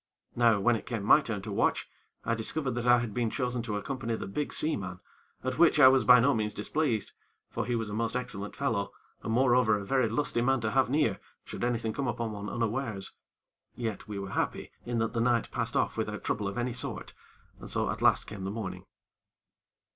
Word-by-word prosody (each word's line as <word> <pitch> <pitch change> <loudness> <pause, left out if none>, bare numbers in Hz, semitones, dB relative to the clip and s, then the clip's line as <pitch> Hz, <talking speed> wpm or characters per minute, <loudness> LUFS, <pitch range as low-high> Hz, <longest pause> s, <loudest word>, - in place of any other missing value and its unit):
Now, 115 -3 +4
when 120 +4 +3
it 110 - -6
came 115 -4 -3
to - - -6
my 150 - +7
turn 110 -8 -4
to - - -5
watch, - - +1 0.4
I 115 - +1
discovered 130 +5 -2
that 120 0 -3
I 120 0 +7
had 120 -3 -3
been 120 -1 0
chosen 125 +1 -2
to 110 -3 -3
accompany 120 +1 -3
the - - -5
big 140 +10 -3
seaman, 95 - -1 0.4
at 130 +4 -3
which 170 -3 +5
I 130 -3 +10
was 130 -4 +3
by 125 +3 +8
no 140 +4 +4
means 105 -2 -2
displeased; 115 -1 -1 0.4
for - - -3
he 120 - 0
was 115 -2 -2
a 105 - -6
most 115 +2 -1
excellent 125 -5 -4
fellow, 115 -8 -1 0.3
and 110 - -4
moreover 120 -2 +4
a 100 - -6
very 130 -1 +2
lusty 120 0 0
man 135 +2 +2
to 110 -1 -1
have 130 0 +3
near, 150 +4 +1 0.3
should - - -6
anything 115 -2 0
come 140 +1 -2
upon 115 -1 -2
one 105 0 -5
unawares. 115 -3 -2 0.6
Yet, 115 -4 -4
we 105 -1 -5
were 100 -1 -5
happy - - -2 0.2
in 120 -1 -1
that 115 0 0
the 115 - 0
night 120 -1 +1
passed - - -2
off - - 0
without - - -3
trouble 105 -1 -1
of 100 - -5
any 120 0 -1
sort, 125 - -4 0.5
and - - -9
so - - 0
at - - -6
last - - +4
came 100 -3 -8
the 95 - -2
morning. 100 -3 -5
115 Hz, 220 wpm, -29 LUFS, 105-125 Hz, 0.6 s, I